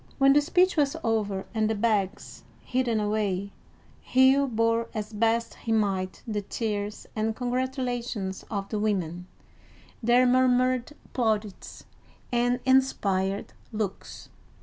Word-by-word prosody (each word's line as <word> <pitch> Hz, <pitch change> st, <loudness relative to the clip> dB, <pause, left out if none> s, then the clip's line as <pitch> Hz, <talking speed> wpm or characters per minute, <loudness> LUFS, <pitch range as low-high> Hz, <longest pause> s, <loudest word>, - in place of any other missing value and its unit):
When 275 Hz, -1 st, +6 dB
the 295 Hz, -, +5 dB
speech 360 Hz, +4 st, +2 dB
was 285 Hz, 0 st, +2 dB
over, 205 Hz, -4 st, -1 dB
and 220 Hz, -1 st, +1 dB
the 220 Hz, -, 0 dB
bags 205 Hz, -2 st, -1 dB, 0.2 s
hidden 245 Hz, -3 st, 0 dB
away, 205 Hz, -2 st, -1 dB, 0.5 s
Hugh 265 Hz, +2 st, +4 dB
bore 230 Hz, -1 st, +1 dB
as 215 Hz, 0 st, -4 dB
best 230 Hz, +2 st, +1 dB
he 225 Hz, -, -6 dB
might 195 Hz, -4 st, 0 dB
the 210 Hz, -2 st, -2 dB
tears 210 Hz, 0 st, -4 dB
and 220 Hz, 0 st, -1 dB
congratulations 245 Hz, -5 st, -2 dB
of 200 Hz, -3 st, -3 dB
the 215 Hz, -, -2 dB
women, 180 Hz, -4 st, -2 dB, 0.7 s
their 240 Hz, +2 st, +4 dB
murmured 255 Hz, +1 st, +2 dB, 0.2 s
plaudits, 215 Hz, -5 st, -2 dB, 0.5 s
and 245 Hz, 0 st, +1 dB
inspired 200 Hz, -7 st, +1 dB, 0.2 s
looks. 210 Hz, -3 st, -5 dB
225 Hz, 120 wpm, -27 LUFS, 205-250 Hz, 0.7 s, When